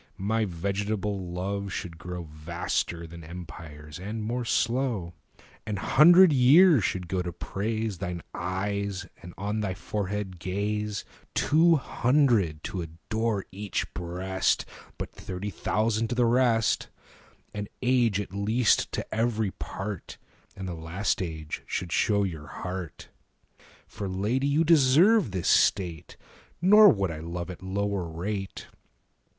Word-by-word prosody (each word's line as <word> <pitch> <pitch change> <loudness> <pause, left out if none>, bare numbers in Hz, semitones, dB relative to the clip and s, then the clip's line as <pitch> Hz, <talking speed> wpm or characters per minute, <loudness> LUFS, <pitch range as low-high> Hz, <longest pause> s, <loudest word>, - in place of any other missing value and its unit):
10 95 - -6
My 110 +1 +1
vegetable 100 +1 -2
love 100 +2 -3
should 85 -2 -5
grow 90 +1 -6
Vaster 85 +2 -3
than 85 0 -10
empires, 80 -3 -9
and 105 +4 -5
more 120 +3 -2
slow; 115 -6 0 0.5
An 105 -1 -3
hundred 170 - +7
years 140 - +6
should 90 -1 -2
go 95 +1 -1
to 90 -1 -4
praise 110 +2 -3
Thine 90 -3 -4
eyes 100 +1 -2 0.2
and 90 - -9
on 105 +2 -2
thy 95 -3 -2
forehead 95 -1 -4
gaze; 105 +3 -2 0.3
Two 165 +3 +4
hundred 120 - +2
to 95 - -4
adore 100 +6 -2
each 100 0 -4
breast, 90 +2 -1
15 - - -17
But - - -5
thirty 95 +2 -6
thousand 110 +3 0
to 120 - -3
the 120 0 +3
rest; 115 -2 +2 0.6
An 105 -1 -4 0.2
age 120 -5 +3
at 100 -2 -5
least 110 +4 +2
to - - -4
every 110 -3 0
part, 95 0 -6 0.4
And 95 -1 -6
the 90 - -4
last 85 +6 -2
age 80 -4 -5
should 90 -2 -3
show 100 +2 +2
your 80 -6 -4
heart. 90 +4 -6 0.8
For, 100 -2 -6
Lady, 110 +9 0
you 145 +3 +3
deserve 165 - +5
this 95 -3 -3
state, 85 -5 +2 0.4
Nor 210 +4 +8
would 100 -4 +1
I 80 - -6
love 85 +2 -5
at 90 - -10
lower 95 -1 -2
rate. 95 +4 -4
100 Hz, 135 wpm, -27 LUFS, 90-115 Hz, 0.8 s, Nor